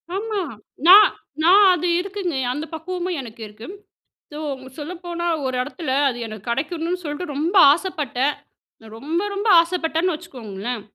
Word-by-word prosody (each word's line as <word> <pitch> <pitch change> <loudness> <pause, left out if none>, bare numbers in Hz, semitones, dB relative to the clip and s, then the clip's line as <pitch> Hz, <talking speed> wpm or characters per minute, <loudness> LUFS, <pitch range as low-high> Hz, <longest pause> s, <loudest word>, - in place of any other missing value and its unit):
ஆமா. 425 +1 -2 0.5
நான் 400 +4 +10 0.4
நான் 390 +5 +7
அது 355 0 -1
இருக்குங்க. 385 -4 -4 0.2
அந்த 295 +4 -4
பக்குவமும் 355 +2 -4
எனக்கு 230 -2 -11
இருக்கு. 210 +2 -12 0.7
ஸோ, 300 - -6 0.4
சொல்லப்போனா 345 +2 -5 0.2
ஒரு 260 -1 -2
இடத்தில 280 +2 -5 0.2
அது 245 - -5
எனக்கு 215 0 -8
கடைக்கணும்னு 330 +7 -2
சொல்லிட்டு 295 +1 -5
ரொம்ப 325 +7 -1 0.2
ஆசைப்பட்டேன். 295 - -2 0.5
நான் 220 -1 -13
ரொம்ப, 315 +7 -2
ரொம்ப 405 +3 -2
ஆசைப்பட்டேன்னு 335 0 -1
வச்சுக்கோங்களேன். 240 - -7
325 Hz, 130 wpm, -22 LUFS, 260-360 Hz, 0.7 s, நான்